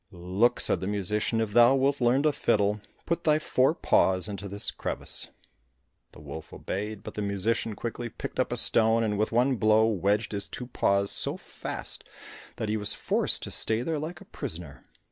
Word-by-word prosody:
"Look," 95 +6 0
said - - +2
the 95 - -4
musician, 105 +3 -1
"if 110 -2 -2
thou 120 +3 +6
wilt 135 +1 +1
learn 125 +4 +3
to 155 - +3
fiddle, 105 -5 0 0.2
put 170 - -2
thy 155 -1 +3
fore 145 -1 +1
paws 95 - +2
into 100 -1 -6
this 100 +1 +1
crevice." - - -2 0.9
The - - -14
wolf 75 +2 -9
obeyed, 105 +2 -5
but - - -8
the 105 - -4
musician 105 +2 -1
quickly 120 +1 -5
picked - - -7
up - - 0
a - - 0
stone 115 0 +3
and 105 -2 0
with 105 +1 -1
one 125 +3 +2
blow 110 0 +4
wedged 105 0 0
his 100 -1 0
two 125 - -7
paws 100 -5 +1
so - - +4
fast - - -6 0.5
that 110 - -4
he 110 +1 -1
was 105 -1 +1
forced - - +1
to - - -5
stay 110 +2 0
there 160 +2 -2
like 165 +4 -6
a - - -12
prisoner. 80 - -8
110 Hz, 190 wpm, -27 LUFS, 100-120 Hz, 0.9 s, thou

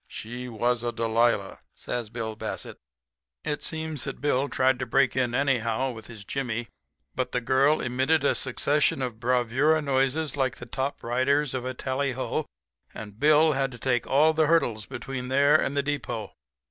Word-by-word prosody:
She 125 +3 -7
was 120 +1 0
a 120 0 -1
Delilah,' 115 -3 +1 0.2
says 120 -3 -4
Bill 110 -1 -4
Bassett. - - -6 0.6
"It 150 -1 -2
seems 160 -5 -3
that - - -5
Bill 140 -1 +1
tried 130 -1 +2
to 125 - -3
break 130 +2 +2
in 125 -2 0
anyhow 130 -2 +1
with 110 -2 -10
his 110 -3 -11
jimmy, 120 -3 -3 0.4
but 130 - -3
the - - +2
girl 135 +5 +3
emitted 130 +5 +1
a - - +3
succession 140 +1 0
of 120 -3 -4
bravura 125 +5 +2
noises 140 +1 0
like 130 -2 0
the 120 - -9
top 135 +4 -3
riders 130 +4 +1
of 130 -1 -3
a 130 0 -3
tally 130 +1 -1
ho, 130 - -2 0.5
and 105 0 -9
Bill 155 +2 +5
had 135 -2 0
to - - -9
take 120 0 0
all 150 +4 +4
the 155 -1 +2
hurdles 120 -10 +1
between 130 -2 -5
there 140 +3 +4
and 145 -2 +1
the 140 - +2
depot. 120 -7 -3
130 Hz, 175 wpm, -26 LUFS, 120-140 Hz, 0.6 s, Bill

